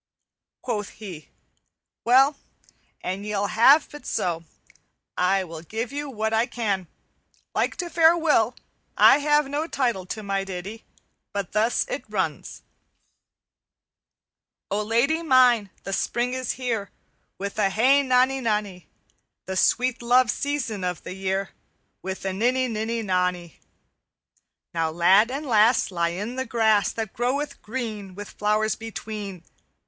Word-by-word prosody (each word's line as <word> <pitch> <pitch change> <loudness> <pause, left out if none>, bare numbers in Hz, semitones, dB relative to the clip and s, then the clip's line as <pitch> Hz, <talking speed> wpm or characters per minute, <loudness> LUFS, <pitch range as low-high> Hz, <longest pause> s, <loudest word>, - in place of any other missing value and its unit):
Quoth 210 -5 -3
he, 180 -8 -9 0.8
'Well, 265 +5 +5 0.7
an 190 +2 -4
ye 210 0 -3
will 200 0 0
ha' 265 +6 +7 0.2
it 295 - -10
so, 170 -2 -1 0.7
I 190 +2 +2
will 165 -3 -8
give 225 +8 -5
you 290 0 -4
what 220 -3 -2
I 225 +2 +2
can. 200 -6 -2 0.7
Like - - 0
to 355 - -4
fair 335 0 +5
Will, 290 -8 +2 0.4
I - - +7
have 295 0 +2
no 295 +3 -2
title 240 - -1
to 215 +3 -5
my 195 -1 -1
ditty, 195 +4 -7 0.5
but 200 -3 -3
thus 220 +3 +1
it - - -4
runs: - - -3 2.1
"_O 205 +1 0
Lady 240 +9 +1
mine, 250 -8 +4
the 195 - -5
spring 240 +5 -1
is 255 -2 -2
here, 230 -6 -3 0.5
With 200 +2 -5
a 200 -2 +3
hey 255 +8 +4
nonny 260 0 +2
nonny; 210 -6 -2 0.6
The 190 - -4
sweet 250 +6 +2
love 245 +1 +4
season 265 -9 -3
of 180 -2 -3
the - - -6
year, 190 +1 -2 0.5
With 190 0 -6
a 190 - -1
ninny 250 +6 +1
ninny 225 0 -2
nonny; 180 -3 -1 1.1
Now 165 -1 0
lad 185 +7 +4
and 280 +4 -4
lass 225 -3 +3
Lie 170 -2 0
in 225 +6 -5
the 260 - -1
grass 220 -3 +2
That 220 -2 -5
groweth 265 +5 -2
green 215 -5 -5
With 205 0 -8
flowers 215 +1 +1
between. 210 -4 -7
220 Hz, 140 wpm, -24 LUFS, 195-255 Hz, 2.1 s, ha